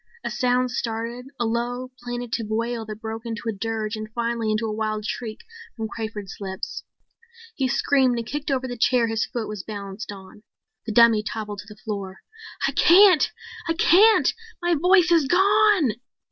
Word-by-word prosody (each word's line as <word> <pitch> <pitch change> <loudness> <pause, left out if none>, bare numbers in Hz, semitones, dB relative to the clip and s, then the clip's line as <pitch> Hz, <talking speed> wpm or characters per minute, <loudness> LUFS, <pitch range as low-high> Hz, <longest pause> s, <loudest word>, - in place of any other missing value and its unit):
A - - -3
sound 250 0 +1
started, 235 +1 -4
a 240 - +1
low, 245 +2 -2
plaintive 245 -2 -4
wail 230 0 -2
that 215 -1 -7
broke 225 0 -5
into 230 -1 -5
a - - +1
dirge 220 +1 -3
and 215 0 -6
finally 235 -2 -1
into 215 +1 0
a 215 - -2
wild 215 -1 -2
shriek 220 -1 -5 0.4
from 220 -1 -3
Crawford's 215 -4 -6
lips. 190 -1 -5 0.7
He 270 -8 0
screamed 260 -1 +2
and 230 - -3
kicked 290 +5 -4
over 260 -1 0
the 245 -2 -6
chair 245 0 +3
his 225 -1 -1
foot 235 -3 -4
was 210 -2 -5
balanced 205 +1 -7
on. 195 +1 -12 0.5
The - - -1
dummy 230 -1 +6
toppled 210 -1 -5
to 210 - -10
the 210 - -13
floor. 200 -3 -6 0.5
"I - - 0
can't! 365 -2 +6 0.4
I - - +3
can't! 410 +7 +5 0.3
My 345 0 +1
voice 355 +2 +4
is 325 -5 +4
gone!" 395 - +4
230 Hz, 175 wpm, -24 LUFS, 215-255 Hz, 0.7 s, dummy